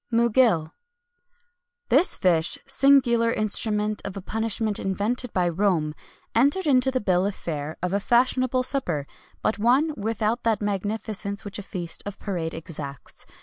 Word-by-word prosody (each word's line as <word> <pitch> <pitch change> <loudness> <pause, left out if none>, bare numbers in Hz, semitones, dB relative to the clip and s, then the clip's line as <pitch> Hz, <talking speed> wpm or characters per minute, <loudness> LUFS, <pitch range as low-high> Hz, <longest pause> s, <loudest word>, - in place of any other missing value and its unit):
MUGIL. 230 -8 +3 1.2
This 365 - +5
fish, 170 -3 +2
singular 265 -4 +4
instrument 210 -1 0
of 200 0 -6
a - - -5
punishment 220 0 -1
invented 215 +5 -2
by 180 -2 +1
Rome,[XXI 170 -4 +1 0.4
183] 230 - +5
entered 290 +7 +2
into 265 -2 +4
the 260 -1 0
bill 185 0 +2
of 200 - -4
fare 155 -1 -5
of 180 +1 -1
a 200 - +2
fashionable 255 +3 +2
supper, 180 - -1 0.4
but 215 - 0
one 265 +8 +3
without 225 +2 -1
that 225 -3 +1
magnificence 205 0 -3
which 205 0 -6
a - - -4
feast 175 -4 -2
of 205 - -6
parade 170 -5 -4
exacts. 150 -4 -7
210 Hz, 150 wpm, -25 LUFS, 185-240 Hz, 1.2 s, This